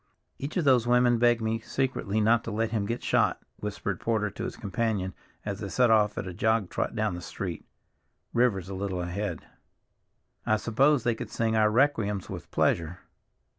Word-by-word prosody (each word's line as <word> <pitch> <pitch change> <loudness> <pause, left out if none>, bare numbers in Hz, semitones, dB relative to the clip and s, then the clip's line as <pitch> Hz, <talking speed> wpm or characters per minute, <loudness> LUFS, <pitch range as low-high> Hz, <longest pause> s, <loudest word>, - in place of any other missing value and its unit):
"Each 140 +6 -4
of 170 - +1
those 125 -4 +4
women 120 -1 +4
begged 120 -1 +4
me 110 0 0
secretly 115 -4 -1
not 115 +2 +3
to 115 - -4
let 110 +1 -1
him 105 -3 -1
get 115 +2 -3
shot," - - +2 0.2
whispered 100 -2 -4
Porter 110 -3 0
to - - -5
his - - -6
companion 100 -2 -2 0.3
as - - -3
they - - -5
set 125 -2 +3
off 105 -2 +3
at - - -3
a 90 - -6
jog 110 0 +1
trot - - -2
down 110 -3 0
the 90 - -6
street, - - -5 0.7
Rivers 115 -7 +2
a 100 - -6
little 95 -2 -3
ahead. 100 +4 -4 1.0
"I 110 - +2
suppose 130 +5 +2
they 120 - +2
could 110 - -7
sing 110 -1 0
our 110 -1 +4
requiems 110 -6 +1
with - - -7
pleasure." 85 +1 +1
110 Hz, 185 wpm, -28 LUFS, 100-120 Hz, 1.0 s, those